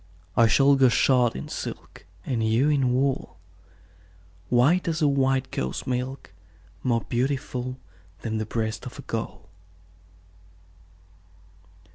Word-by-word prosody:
I 115 - +6
shall 140 +5 +5
go 130 -2 +6
shod 125 -1 +3
in 65 - -6
silk, - - -7 0.2
And 120 -4 -1
you 115 +6 +3
in 135 -4 +2
wool, 135 +1 0 1.1
White 145 +10 +3
as 160 -2 0
a - - +5
white 135 -1 +1
cow's 65 +1 -3
milk, 130 +1 -4 0.5
More 120 -2 +1
beautiful 130 0 -2 0.4
Than 110 -1 -2
the 110 - -3
breast 110 -1 -3
of - - -9
a - - -8
gull. - - -5
130 Hz, 120 wpm, -25 LUFS, 115-135 Hz, 1.1 s, I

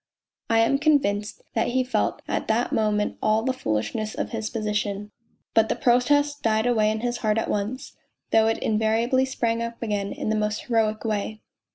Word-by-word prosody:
I 225 0 +4
am 275 +5 +2
convinced 245 -9 +1
that 225 - +1
he 255 +1 +1
felt 255 - -1
at - - -2
that 230 +2 +1
moment 210 -1 0
all 215 +1 +2
the 260 +1 0
foolish: 110 - -2
of 215 0 -3
his 220 -2 -3
position; 210 -2 -2 0.4
but 225 0 +4
the - - +1
protest 290 +4 +2
died 220 0 +1
away 220 -3 +3
in 220 0 -2
his 240 0 -1
heart 215 -1 0
at 225 - -1
once, 215 +7 -3 0.4
though 220 0 +5
it 225 - +1
invariably 225 +4 +1
sprang 230 -3 -1
up 235 0 -5
again 205 -3 -2
in - - -4
the 220 - +1
most 210 0 -1
heroic 220 -2 0
way. 215 0 -2
220 Hz, 185 wpm, -25 LUFS, 215-240 Hz, 0.4 s, though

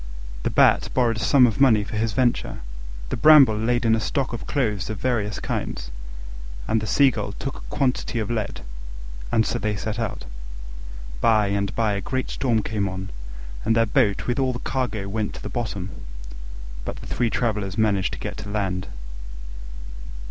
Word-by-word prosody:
The - - -1
Bat - - +4
borrowed 120 -3 +2
a - - -3
sum 130 +2 +5
of 115 +2 0
money 110 -6 +5
for 105 - -6
his 110 0 0
venture; 125 -1 0 0.5
the - - -1
Bramble 150 -8 +7
laid 120 +3 0
in 110 - +4
a 110 - +3
stock 130 +3 -1
of 120 - -6
clothes 110 -9 -1
of 110 - -3
various 105 -4 -1
kinds; - - -4 0.8
and 110 - +1
the 110 - -4
Seagull 110 -5 +2
took 135 - -5
a - - -9
quantity 130 -3 0
of 110 0 -2
lead: 110 -3 -3 0.7
and 110 - +3
so 120 - -1
they 105 -2 -1
set 110 +3 -3
out. 110 - -3 0.9
By 105 - +3
and 100 0 -1
by 110 -2 +1
a 100 - -2
great 130 +3 -3
storm 115 -5 +1
came 100 -3 -1
on, 95 0 -6 0.5
and 115 - +2
their 115 0 +4
boat 110 -3 +1
with 120 +2 -1
all 130 -1 +1
the - - -3
cargo 115 -6 -2
went 105 +1 -2
to - - -9
the - - -5
bottom, 100 -6 -4 0.9
but - - -4
the - - -10
three 120 -1 0
travellers 105 -5 -1
managed 100 -4 +1
to - - -4
reach - - -6
land. 95 -3 -2
110 Hz, 180 wpm, -24 LUFS, 100-120 Hz, 0.9 s, Bramble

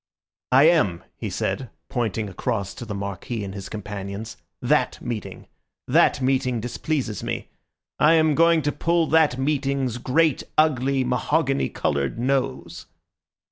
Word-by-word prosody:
"I 130 +2 +7
am," 150 - +3
he - - -5
said, 130 -3 -2 0.2
pointing 110 -3 -2
across 100 0 -3
to 120 - -8
the 105 -2 -5
Marquis 100 +3 -4
and 95 -1 -6
his 100 -2 -7
companions, 105 +1 -6 0.2
"that - - +1
meeting. 115 -3 -6 0.4
That - - +4
meeting 130 -2 +1
displeases 120 0 -3
me. - - -4 0.5
I 155 +2 +6
am 160 -2 +4
going 165 +1 +4
to 145 - +1
pull 170 +2 +1
that 155 -5 +4
meeting's 135 -3 -1
great 150 +3 +2 0.2
ugly, 135 -3 +3
mahogany 135 +3 0
coloured 70 +4 -1
nose." 130 +2 -2
130 Hz, 135 wpm, -24 LUFS, 105-150 Hz, 0.5 s, I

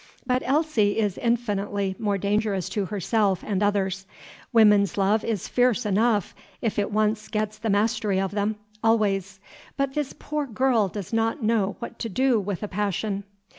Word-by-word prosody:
But 250 0 +1
Elsie 270 -8 +2
is 205 -4 0
infinitely 205 -4 -1
more 205 -3 0
dangerous 200 -1 0
to 205 -2 -1
herself 200 0 0
and 200 -2 -1
others. 195 -2 0 0.4
Women's 210 -5 +5
love 200 +2 +2
is 220 -5 -2
fierce 245 -2 +2
enough, 210 0 +1 0.3
if 225 -2 -1
it 205 - 0
once 215 0 0
gets 215 -1 -2
the 225 - -2
mastery 205 -1 +1
of 195 -1 -1
them, 205 +1 -1 0.3
always; 200 -4 +1 0.4
but 275 -1 0
this 295 -2 -2
poor 300 -1 -3
girl 240 -3 +2
does 200 +1 -7
not 225 +4 0
know 215 -3 +1
what 235 -1 -8
to 230 - -3
do 255 +2 +2
with 200 -1 -4
a - - -2
passion." 200 0 -2
210 Hz, 165 wpm, -25 LUFS, 200-230 Hz, 0.4 s, Women's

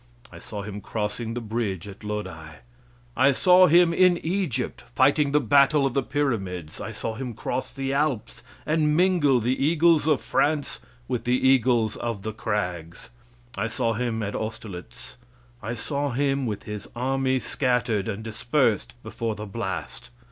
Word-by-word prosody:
I - - -11
saw 105 -1 -7
him 105 0 -7
crossing 110 +2 -3
the 120 - -3
bridge 105 -5 -3
at 100 +1 -11
Lodi. 95 -7 -5 0.6
I 135 +2 +5
saw 180 +6 +6
him 170 +1 +5
in 180 0 +5
Egypt, 175 - -1
fighting 140 +1 +3
the 150 - +4
battle 140 +3 +4
of 135 - 0
the 140 - +2
pyramids. 100 - -2
I - - -5
saw 110 +1 -4
him 120 0 -6
cross 130 - -3
the 135 0 -3
Alps, 140 - -1 0.2
and 155 -1 +2
mingle 170 -8 +4
the 120 +3 +1
eagles 160 0 +4
of 150 -4 +3
France 150 -1 0 0.3
with 125 -2 -3
the 125 +1 +3
eagles 125 -4 +3
of 115 -5 -4
the 110 0 -4
crags. 90 -4 -4 0.4
I 105 +2 -2
saw 115 0 0
him 115 -1 -2
at 100 - -3
Austerlitz. 110 -4 -7 0.4
I 115 +3 -4
saw 140 +4 -2
him 135 0 0
with 105 -2 -4
his 105 -1 -7
army 130 +1 0
scattered 125 -6 0
and 110 0 -4
dispersed 115 +1 0
before 115 -2 -3
the 105 - -6
blast. 100 -2 -5
120 Hz, 160 wpm, -25 LUFS, 105-140 Hz, 0.6 s, saw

